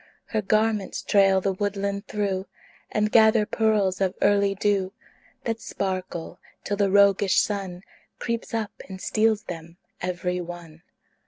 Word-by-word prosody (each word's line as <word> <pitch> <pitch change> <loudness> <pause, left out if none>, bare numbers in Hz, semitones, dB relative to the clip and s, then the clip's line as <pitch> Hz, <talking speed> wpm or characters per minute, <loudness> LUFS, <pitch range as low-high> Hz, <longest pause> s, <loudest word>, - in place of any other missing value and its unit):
Her 220 - -1
garments 215 0 0
trail 195 -1 +4
the 195 0 0
woodland 200 +1 -2
through, 195 -2 -2 0.4
And 210 0 0
gather 220 -1 +5
pearls 210 -4 +1
of 190 -1 +1
early 200 -1 +3
dew 195 -1 0 0.5
That 225 -2 -2
sparkle 185 -5 -4 0.2
till 205 - -2
the 200 -1 +2
roguish 200 -1 +4
Sun 195 -3 -2 0.3
Creeps 235 0 -3
up 220 -3 -2 0.2
and 190 -1 -7
steals 215 +1 +1
them 165 -2 -8 0.2
every 180 0 -2
one. 170 -2 -9
200 Hz, 135 wpm, -25 LUFS, 185-210 Hz, 0.5 s, gather